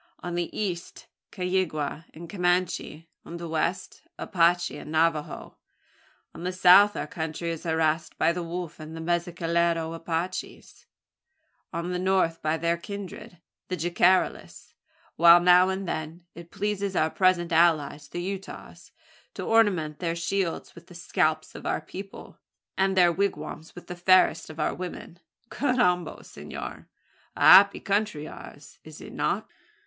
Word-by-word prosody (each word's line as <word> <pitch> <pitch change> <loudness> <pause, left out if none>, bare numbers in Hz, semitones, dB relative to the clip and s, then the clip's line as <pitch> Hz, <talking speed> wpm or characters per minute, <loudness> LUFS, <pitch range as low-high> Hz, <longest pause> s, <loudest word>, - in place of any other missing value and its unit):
On 175 - -4
the 175 -1 -2
east 180 -5 -4 0.3
Caygua 175 -5 -2
and 170 +2 -9
Comanche, 175 -3 -1 0.2
on 170 - -8
the 170 0 -6
west 165 +3 -2 0.2
the - - -5
Apache 175 -1 +2
and 150 - -9
Navajo. 160 -1 -1 0.7
On - - -10
the 180 - -1
south 185 +3 +6
our - - -2
country 160 +1 -4
is 165 +1 -7
harassed 160 -1 0
by - - +3
the 175 +1 -4
Wolf 170 -1 -6
and 155 +1 -9
Mezcalero 170 -1 -1
Apaches, 165 +2 -5 0.8
on 170 +2 -4
the 180 - -2
north 185 -3 +1
by 155 +1 0
their 170 +1 0
kindred, 200 +1 -9 0.3
the 185 - -3
Jicarillas; 175 +3 0 0.4
while, 170 +1 +8
now 180 +1 +5
and 190 0 -3
then, 160 +2 -5
it 170 0 -12
pleases 200 -1 -3
our 155 -1 +1
present 185 -2 +2
allies 155 -3 +2
the 175 +4 -5
Utahs, 195 +1 -8 0.4
to - - -5
ornament 185 -10 +2
their 170 -2 -2
shields 170 +1 -2
with 170 0 -15
the 175 - -14
scalps 155 -2 -1
of - - -8
our - - 0
people, 195 +1 -10 0.4
and 190 0 +1
their 175 -1 +6
wigwams 165 -4 -3
with 175 - -11
the 180 - -7
fairest 185 0 +3
of 155 0 -10
our - - 0
women. 180 -1 -8 0.3
Carrambo! 210 -11 0
senor! - - -9 0.5
a - - -8
happy 200 +1 +8
country 200 -7 -1
ours, - - -12
is - - -12
it - - -11
not?" - - -1
175 Hz, 145 wpm, -26 LUFS, 165-185 Hz, 0.8 s, while